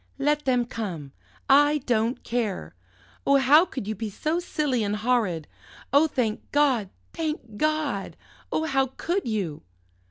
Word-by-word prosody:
"Let 295 +2 +1
them 250 -2 +2
come, 180 - -5 0.4
I 290 +2 +5
don't 230 0 0
care! 230 -5 -2 0.5
Oh, 280 - +5
how 285 +6 +6
could 260 - -6
you 215 - -1
be 215 +1 -4
so 310 - -1
silly 295 -9 -1
and 205 0 -1
horrid? 210 -8 0 0.5
Oh, 290 +3 +6
thank 230 -7 -2
God, 265 -9 +2 0.2
thank 305 -9 -4
God! 305 -8 -1 0.3
Oh, 315 - 0
how 270 -3 +2
could 355 -2 -1
you?" 195 -9 -2
250 Hz, 140 wpm, -26 LUFS, 215-295 Hz, 0.5 s, how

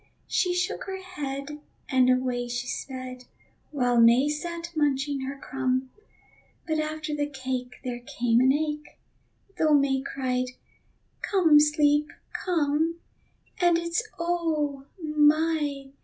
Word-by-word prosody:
She 360 -1 +1
shook 360 +1 -1
her 380 -1 -5
head 295 -5 -6 0.3
and 255 -2 +4
away 255 -1 +1
she 245 0 -3
sped, 255 -1 -6 0.4
While 245 -5 +2
May 240 +5 +6
sat 340 +3 -4
munching 285 -2 +1
her 275 +1 -5
crumb. 260 -1 -2 0.8
But 315 -1 0
after 310 0 -3
the 290 0 -1
cake 260 -2 -4
there 245 -2 -4
came 240 -1 +1
an 260 +1 +5
ache, 300 +1 -2 0.6
Though 310 -2 +5
May 275 -2 +2
cried: 255 -2 -2 0.7
"Come, 330 -7 +5
Sleep, 295 0 +3 0.4
come, 320 -2 +1 0.7
And 350 -1 +5
it's 340 +5 -1 0.2
oh! 315 -5 -1 0.2
my! 300 -2 +2
290 Hz, 120 wpm, -27 LUFS, 260-315 Hz, 0.8 s, May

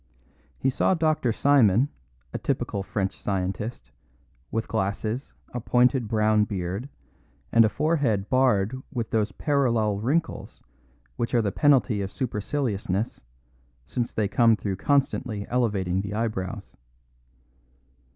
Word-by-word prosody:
He 135 - +1
saw 185 - +2
Dr. 155 -7 +1
Simon, 125 -2 +4 0.5
a - - -3
typical 100 - -2
French 95 -1 -3
scientist, 95 - -3 0.6
with 115 0 -2
glasses, 110 +4 -2 0.2
a 120 - -2
pointed 125 +1 +2
brown 110 -1 +3
beard, 100 +5 -4 0.6
and 115 - +6
a 110 - +3
forehead 135 -10 0
barred 130 -2 +2
with 120 -4 -3
those 110 -3 +1
parallel 115 -9 +1
wrinkles 155 +9 -2 0.5
which 115 - -1
are 120 - +4
the 100 - 0
penalty 135 -5 +3
of 95 0 -4
superciliousness, 110 -4 -2 0.6
since 120 - -2
they 105 -2 0
come 115 +2 +4
through 100 -3 -3
constantly 130 -5 0
elevating 100 -7 0
the 100 +1 -5
eyebrows. 105 -3 -3
110 Hz, 120 wpm, -26 LUFS, 100-130 Hz, 0.6 s, and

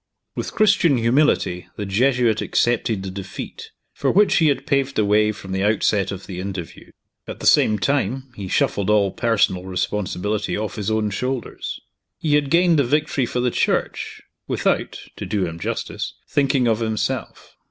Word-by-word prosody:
With - - -4
Christian 190 -9 +4
humility 115 -7 +2
the 105 - -4
Jesuit 120 +2 +2
accepted 115 -4 0
the 95 - -5
defeat, 95 0 -7 0.2
for - - -1
which 205 +2 +4
he 160 - +4
had 140 -2 0
paved 140 -1 0
the 110 - +2
way 105 +1 +3
from 95 -2 -9
the 95 0 -1
outset 105 -1 +1
of 95 -1 -7
the 90 -2 -7
interview. 95 -3 -6 0.4
At - - -7
the - - -6
same 105 - +5
time, 130 +1 -1
he 100 -2 -6
shuffled 100 +2 0
all 105 -2 +3
personal 100 -6 +1
responsibility 105 +2 -2
off 105 0 -4
his 105 0 -2
own 110 -1 0
shoulders. 125 +4 -4 0.4
He 155 -2 -1
had 145 -1 +2
gained 170 -1 +4
the - - +4
victory 140 -1 0
for 125 - -2
the 125 0 +1
Church - - -1 0.2
without - - 0 0.2
(to - - -5
do 100 -3 0
him 85 -1 -6
justice) - - -4
thinking 135 -3 +2
of 110 -1 +2
himself. 110 -2 -3
110 Hz, 170 wpm, -22 LUFS, 100-135 Hz, 0.4 s, same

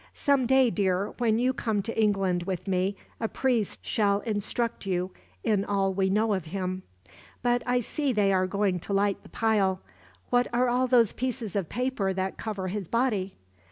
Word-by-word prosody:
"Some 280 -4 +2
day, 265 -2 +4
dear, 195 -1 0
when 225 -2 +2
you 250 +2 +2
come 220 -5 -1
to 230 - -5
England 195 -5 +2
with 185 +1 -4
me, 190 +1 +1 0.2
a 225 - 0
priest 240 -4 -1
shall 200 -2 +1
instruct 225 0 -2
you 180 0 -1 0.3
in 210 -3 +2
all 195 -1 0
we 190 0 +1
know 215 +2 +2
of 190 -4 -2
Him. 185 +2 -3 0.6
"But 245 0 +2
I 245 0 +2
see 285 +4 -1
they 205 -4 +2
are 185 0 +2
going 195 -1 0
to 200 - -5
light 200 0 +1
the - - -16
pile. 200 -4 +1 0.5
What 245 0 +3
are 245 +1 +2
all 250 +1 +2
those 240 -4 +4
pieces 235 -5 -3
of 195 -5 -1
paper 240 -6 -1
that 190 0 -3
cover 200 -4 -3
his 195 -2 -4
body?" 215 -5 0
205 Hz, 185 wpm, -27 LUFS, 190-240 Hz, 0.6 s, day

